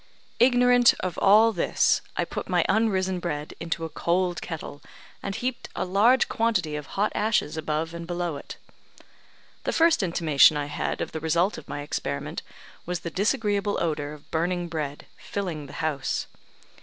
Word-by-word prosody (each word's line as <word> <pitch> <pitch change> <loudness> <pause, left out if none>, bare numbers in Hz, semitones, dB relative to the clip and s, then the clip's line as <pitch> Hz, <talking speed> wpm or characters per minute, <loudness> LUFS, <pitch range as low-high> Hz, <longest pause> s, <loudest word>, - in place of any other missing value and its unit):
Ignorant 245 0 +5
of 180 -2 -3
all 215 +3 +6
this, 180 - +2 0.2
I - - +1
put - - -6
my - - +2
unrisen 190 -4 +1
bread 150 -4 -4
into 165 0 -3
a - - -5
cold 175 +3 0
kettle, 155 -3 -7 0.4
and 200 -1 -4
heaped 250 0 -3
a - - -1
large 215 +8 +4
quantity 215 -10 0
of 150 -2 -6
hot 210 +2 +2
ashes 210 -8 +1
above 160 +1 -2
and 170 0 -7
below 175 -2 -2
it. - - -9 1.1
The - - -1
first 330 -3 +4
intimation 160 -5 +4
I 145 - -1
had 145 +1 -3
of - - -3
the 160 - -4
result 170 +5 +1
of - - -16
my 145 - -4
experiment 70 - -4 0.4
was 180 0 -3
the 170 - -5
disagreeable 205 +1 0
odour 150 -3 -2
of 150 - -15
burning 175 +1 -1
bread 150 -3 -4
filling 170 -8 -4
the - - -12
house. 140 -4 -1
175 Hz, 165 wpm, -26 LUFS, 155-205 Hz, 1.1 s, all